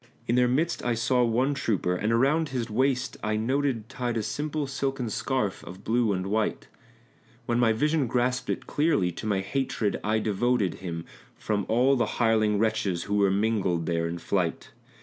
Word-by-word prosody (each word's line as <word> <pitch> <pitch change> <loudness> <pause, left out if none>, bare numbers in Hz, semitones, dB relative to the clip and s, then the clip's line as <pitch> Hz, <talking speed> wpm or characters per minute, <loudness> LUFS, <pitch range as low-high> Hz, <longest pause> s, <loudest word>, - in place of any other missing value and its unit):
In 115 - 0
their 125 0 +4
midst 150 +8 0
I 120 -1 +1
saw 125 +2 +2
one 125 +4 +2
trooper, 100 -9 0
and 105 +5 -1
around 140 +7 +2
his 120 -4 -3
waist 130 +2 0
I 110 0 0
noted 125 0 0
Tied 120 -1 -3
a 110 - -1
simple 150 +4 -2
silken 135 -3 -2
scarf 120 -4 -1
of 95 +3 -10
blue 115 0 +2
and 95 -1 -1
white; 105 +2 -1 0.8
When 120 0 0
my 120 -2 +4
vision 150 +4 +1
grasped 125 +2 0
it - - -2
clearly 145 - +1
to 100 +6 -6
my 100 -2 +1
hatred 110 -1 -1
I 110 +1 +1
devoted 110 -2 0
Him, 85 -3 -5 0.3
from 100 -2 -2
all 125 +4 +4
the 120 - +1
hireling 110 -3 +3
wretches 110 -5 0
who 100 - -4
were 100 -1 +4
mingled 95 -4 +1
there 85 0 0
in 85 +1 -4
flight. 90 -1 -2
115 Hz, 180 wpm, -27 LUFS, 100-130 Hz, 0.8 s, their